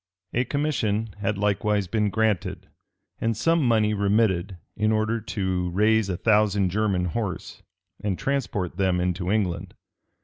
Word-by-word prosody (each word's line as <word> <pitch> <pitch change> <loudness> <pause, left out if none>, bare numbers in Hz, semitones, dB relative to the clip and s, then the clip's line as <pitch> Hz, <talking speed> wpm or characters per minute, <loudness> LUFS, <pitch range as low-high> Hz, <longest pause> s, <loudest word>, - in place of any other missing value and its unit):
A 125 +1 +1
commission 115 -8 -1
had 100 0 -1
likewise 105 0 +1
been 105 +3 0
granted, 110 -2 -1 0.5
and 115 -2 0
some 165 +7 +2
money 110 -3 +3
remitted, 100 -3 +1 0.2
in 110 +1 +1
order 110 +1 0
to 95 -4 -2
raise 105 +3 +2
a 90 - -1
thousand 105 -3 +2
German 100 -3 +1
horse, 95 +1 -4 0.4
and 100 -3 -1
transport 120 - -2
them 95 -2 +2
into 90 0 -1
England. 100 -4 -1
105 Hz, 135 wpm, -25 LUFS, 95-110 Hz, 0.5 s, money